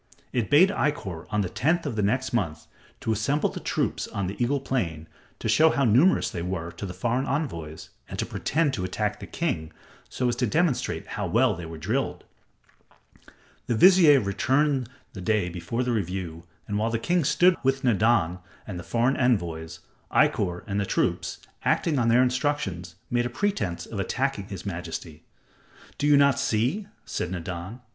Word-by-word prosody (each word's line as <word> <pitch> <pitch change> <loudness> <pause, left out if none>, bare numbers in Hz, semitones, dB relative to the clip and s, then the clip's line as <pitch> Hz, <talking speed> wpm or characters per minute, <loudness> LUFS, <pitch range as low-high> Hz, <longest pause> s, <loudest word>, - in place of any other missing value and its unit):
It 120 -4 0
bade 165 +7 +6
Ikkor 95 - -2
on 105 - +1
the 95 - -1
tenth 165 - +1
of 135 -6 -3
the 105 - 0
next 130 +6 0
month 80 -9 -1 0.4
to 115 - -1
assemble 135 +8 +1
the - - -7
troops - - -1
on 100 - -3
the 100 +6 -2
Eagle 140 +4 +1
Plain 85 -13 -2 0.3
to - - -4
show 160 +1 +5
how 140 - +1
numerous 130 - +4
they 85 - -4
were 85 -1 -3
to 100 - -6
the 90 - -6
foreign 120 +3 0
envoys 85 - -4 0.2
and - - -6
to - - -1
pretend 155 -3 0
to 95 - -2
attack 105 +3 -2
the - - -8
king, 85 - -2 0.4
so 125 - -1
as 120 - +1
to 125 - +1
demonstrate 160 - 0
how - - -4
well - - +3
they 85 0 -7
were 80 0 -8
drilled. 110 - -2 1.4
The 120 - +1
vizier 170 - +7
returned 130 +5 +1 0.2
the 95 - -7
day 100 -1 +1
before 90 +8 -3
the 125 - -1
review, 90 -5 -3 0.2
and 105 0 -1
while 110 +2 +1
the 115 - 0
king 175 +8 +1
stood 175 +6 +4
with 135 +1 +1
Nadan 105 -7 +2 0.3
and 90 -4 -6
the - - -7
foreign 120 +6 +1
envoys, 85 -10 0 0.3
Ikkor 90 0 +2
and 100 -1 -2
the 100 - 0
troops, - - 0 0.3
acting 150 -5 +1
on 115 - +2
their 120 +2 +5
instructions, 125 - -1 0.2
made 120 0 +1
a - - -7
pretense 130 - -2
of 105 - -6
attacking 130 0 -1
his 100 -1 -7
majesty. 85 -4 -6 0.7
"Do 145 - +1
you 145 -1 +6
not 140 -3 +4
see?" 130 - 0 0.2
said 90 - -3
Nadan. 95 +5 -6
115 Hz, 180 wpm, -26 LUFS, 90-135 Hz, 1.4 s, vizier